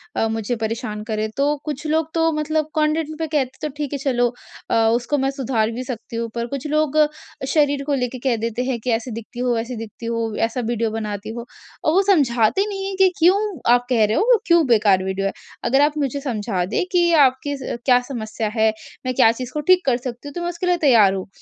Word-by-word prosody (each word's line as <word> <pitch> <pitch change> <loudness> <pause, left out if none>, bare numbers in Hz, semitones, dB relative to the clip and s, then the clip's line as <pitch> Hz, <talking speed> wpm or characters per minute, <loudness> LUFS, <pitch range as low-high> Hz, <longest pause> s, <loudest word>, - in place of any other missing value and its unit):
अ, 225 - +1
मुझे 225 +2 -2
परेशान 220 -1 -4
करें। 215 -1 -2
तो 280 - +2 0.2
कुछ 300 0 -5
लोग 315 +1 0
तो 325 0 +2
मतलब 305 0 -1
कंटेंट 310 0 +1
पे 320 - -1
कहते 300 -1 +1
हैं 255 - -25
तो 305 - -2
ठीक 295 -2 -3
है - - -1
चलो 245 -3 +1 0.7
उसको 245 +5 -1
मैं 270 0 +1
सुधार 235 -5 -1
भी 245 +3 -5
सकती 240 -2 -7
हूँ। 230 0 -2
पर 235 0 -1
कुछ 275 +2 -5
लोग 305 0 +1 0.6
शरीर 285 -2 +2
को 290 - 0
लेके 255 -1 -2
कह 250 -3 +3
देते 230 +2 -1
हैं 255 -2 -1
कि 250 - 0
ऐसी 240 +2 -8
दिखती 230 +2 -8
हो, 245 -1 +1
वैसे 235 +2 -3
दिखती 225 +1 -8
हो, 230 -2 -2
ऐसा 235 +2 -3
वीडियो 230 -1 0
बनाती 215 -1 -4
हो। 235 - -6 0.4
और 310 - +2
वो 380 - +5
समझाते 255 - +3
नहीं 390 -1 -4
है 390 - -4
कि 380 - +6
क्यों 355 +4 +5 0.4
आप 245 0 +2
कह 235 -4 +3
रहे 215 +1 0
हो - - +3
वो 465 - +6
क्यों 340 -2 +4
बेकार 205 -5 +4
वीडियो 190 +1 -1
है। - - -3 0.4
अगर 270 +3 +4
आप 300 0 -6
मुझे 275 +1 -3
समझा 215 -8 -2
दें 200 - -1
कि 350 -2 +3
आपकी 265 +2 -1 0.3
क्या 250 -2 +5
समस्या 220 -2 -3
है, 220 -1 +4 0.4
मैं 255 - 0
क्या 225 - +6
चीज़ 250 +1 -6
को 300 - -2
ठीक 370 0 +4
कर 255 -3 +2
सकती 245 +2 -6
हूँ 285 - -8
तो 345 - -4
मैं 345 - -2
उसके 350 +1 -4
लिए 355 0 +3
तैयार 215 -8 +6
हूँ। 190 -1 -4
250 Hz, 235 wpm, -21 LUFS, 225-300 Hz, 0.7 s, कि